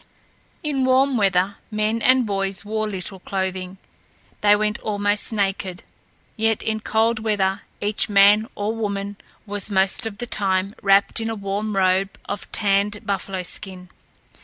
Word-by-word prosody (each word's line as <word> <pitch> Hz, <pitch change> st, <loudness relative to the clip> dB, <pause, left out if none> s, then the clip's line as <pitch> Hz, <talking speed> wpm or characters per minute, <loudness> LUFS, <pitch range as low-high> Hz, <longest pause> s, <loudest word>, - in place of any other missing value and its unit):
In 285 Hz, -4 st, 0 dB
warm 260 Hz, +1 st, +3 dB
weather 195 Hz, -2 st, +2 dB
men 215 Hz, +1 st, -1 dB
and 255 Hz, 0 st, +4 dB
boys 195 Hz, -1 st, -2 dB
wore 215 Hz, 0 st, -2 dB
little 190 Hz, 0 st, -5 dB
clothing. 190 Hz, 0 st, -3 dB, 0.6 s
They 205 Hz, 0 st, +6 dB
went 210 Hz, 0 st, -1 dB
almost 205 Hz, 0 st, 0 dB
naked; 195 Hz, -2 st, -2 dB, 0.5 s
yet 225 Hz, -1 st, 0 dB
in 220 Hz, 0 st, -1 dB
cold 220 Hz, +1 st, +1 dB
weather 205 Hz, -3 st, 0 dB, 0.2 s
each 210 Hz, +1 st, 0 dB
man 205 Hz, +2 st, +6 dB
or 205 Hz, +2 st, -2 dB
woman 200 Hz, -2 st, -3 dB, 0.3 s
was 205 Hz, -1 st, -2 dB
most 195 Hz, +3 st, +2 dB
of 205 Hz, -2 st, -7 dB
the 240 Hz, -, -4 dB
time 195 Hz, -3 st, 0 dB
wrapped 195 Hz, +3 st, +4 dB
in 225 Hz, 0 st, -2 dB
a 225 Hz, -, -2 dB
warm 200 Hz, +1 st, -3 dB
robe 190 Hz, +1 st, +2 dB
of 205 Hz, -, -6 dB
tanned 205 Hz, +1 st, +1 dB
buffalo 195 Hz, -2 st, -2 dB
skin. 180 Hz, 0 st, -6 dB
205 Hz, 145 wpm, -22 LUFS, 195-215 Hz, 0.6 s, They